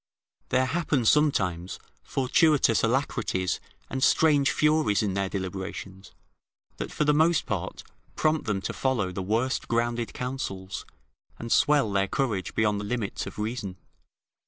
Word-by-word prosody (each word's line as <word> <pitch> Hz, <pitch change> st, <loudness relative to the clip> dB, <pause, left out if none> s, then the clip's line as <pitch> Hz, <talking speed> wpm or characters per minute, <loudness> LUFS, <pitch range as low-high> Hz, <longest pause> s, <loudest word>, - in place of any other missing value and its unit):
There 130 Hz, -, +3 dB
happen, 145 Hz, -3 st, 0 dB
sometimes, 95 Hz, -, +2 dB, 0.2 s
fortuitous 135 Hz, -2 st, +3 dB
alacrities 115 Hz, -7 st, 0 dB, 0.3 s
and 130 Hz, -, -4 dB
strange 145 Hz, -3 st, +4 dB
furies 150 Hz, -9 st, +2 dB
in 100 Hz, -3 st, -1 dB
their 100 Hz, 0 st, -1 dB
deliberations, 95 Hz, 0 st, -6 dB, 0.7 s
that -, -, -5 dB
for -, -, 0 dB
the 150 Hz, 0 st, +3 dB
most 160 Hz, +2 st, +3 dB
part -, -, -4 dB, 0.3 s
prompt 155 Hz, -3 st, +1 dB
them 100 Hz, -3 st, 0 dB
to -, -, -3 dB
follow 120 Hz, -9 st, 0 dB
the 95 Hz, -, -4 dB
worst 115 Hz, +7 st, -1 dB
grounded 120 Hz, 0 st, 0 dB
counsels, 100 Hz, -8 st, -5 dB, 0.5 s
and 115 Hz, -, -7 dB
swell 145 Hz, -7 st, +4 dB
their 100 Hz, 0 st, +1 dB
courage 105 Hz, -4 st, -2 dB
beyond 105 Hz, -2 st, +2 dB
the -, -, -5 dB
limits 110 Hz, -2 st, -3 dB
of -, -, -9 dB
reason. 105 Hz, -3 st, -4 dB
115 Hz, 135 wpm, -27 LUFS, 95-140 Hz, 0.7 s, strange